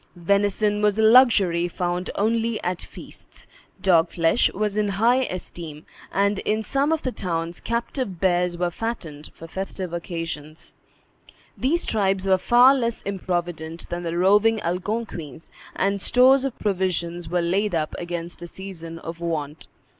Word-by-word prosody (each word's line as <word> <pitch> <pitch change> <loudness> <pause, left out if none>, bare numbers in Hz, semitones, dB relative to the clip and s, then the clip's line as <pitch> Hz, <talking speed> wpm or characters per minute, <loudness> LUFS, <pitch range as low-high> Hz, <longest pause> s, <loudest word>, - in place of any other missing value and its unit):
Venison 205 +3 +1
was 210 0 +2
a 220 - +2
luxury 215 -8 +5
found 175 +1 -3
only 225 +2 0
at 180 0 -2
feasts; - - -12 0.4
dog 170 -3 +4
flesh 165 +6 +2
was 210 0 -2
in 210 -1 +1
high 235 +6 +2
esteem; 165 -4 -7 0.3
and, 200 0 +1
in 215 +1 -1
some 275 +6 0
of 320 - 0
the 255 - -1
towns 170 -4 -3
captive 235 - -3
bears 180 -1 +1
were 175 0 0
fattened 170 -9 -5
for 165 - -10
festive 190 0 -5
occasions. 165 -3 -6 0.8
These 325 +7 0
tribes 195 -3 0
were 190 -1 +3
far 245 +6 +6
less 235 -4 -2
improvident 175 -4 -4
than 175 0 -3
the 170 0 -3
roving 210 +5 +4
Algonquins, 175 - -4 0.2
and 200 0 0
stores 260 +4 +5
of 270 - -4
provision 180 -4 -1
were 175 +1 +1
laid 190 +2 0
up 155 -1 -1
against 175 0 -5
a 175 - -6
season 170 -3 -8
of 165 0 -8
want. 160 -3 -4
185 Hz, 145 wpm, -23 LUFS, 170-215 Hz, 0.8 s, far